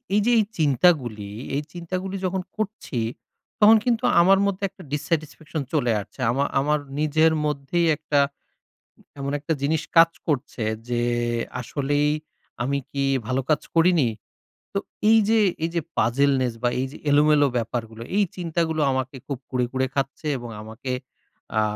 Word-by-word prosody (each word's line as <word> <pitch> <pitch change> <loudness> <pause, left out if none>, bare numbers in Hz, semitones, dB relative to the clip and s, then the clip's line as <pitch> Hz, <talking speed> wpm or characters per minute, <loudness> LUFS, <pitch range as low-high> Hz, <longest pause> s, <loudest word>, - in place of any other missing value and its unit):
এই 210 - +4
যে 245 - +4
এই 210 - +3
চিন্তাগুলি, 130 - +2 0.3
এই 145 - 0
চিন্তা 175 +1 -5
গুলি 195 0 -4
যখন 185 0 -1 0.2
করছি, 205 - -3 0.6
তখন 215 +1 +8
কিন্তু 240 0 +1 0.2
আমার 195 +2 +5
মধ্যে 200 0 -3
একটা 190 -1 -14
ডিস-স্যাটিসফ্যাকশন 155 0 -2
চলে 125 -6 +2
আসছে। 115 - -16
আমা 140 +3 +1
আমার 150 +2 +1 0.2
নিজের 155 +1 +3
মধ্যেই 150 +4 0
একটা, 150 -1 +1 1.0
এমন 140 0 -2
একটা 160 +3 -1
জিনিস 155 +2 +1
কাজ 165 0 +8 0.2
করছে, 140 -5 -1 0.3
যে 120 -1 0 0.6
আসলেই 145 +3 0 0.5
আমি 140 +3 0
কি 140 -1 -1 0.2
ভালো 130 +1 0
কাজ 150 - +3
করিনি? 165 -7 +4 0.6
তো 200 - 0 0.3
এইযে, 225 0 +5 0.2
এইযে 170 0 0 0.2
পাজলনেস 130 +1 +2
বা 120 - +3
এইযে 135 +2 -4
এলোমেলো 145 0 +5
ব্যাপারগুলো, 115 -1 -3
এই 205 - +4
চিন্তাগুলো 165 -2 -1
আমাকে 130 +1 -2
খুব 140 -3 -4
কুরে, 125 -2 +1
কুরে 130 0 +1
খাচ্ছে। 135 +2 -2
এবং 120 -1 -8
আমাকে, 115 +4 -6 0.7
আ - - +5
150 Hz, 145 wpm, -24 LUFS, 130-170 Hz, 1.0 s, তখন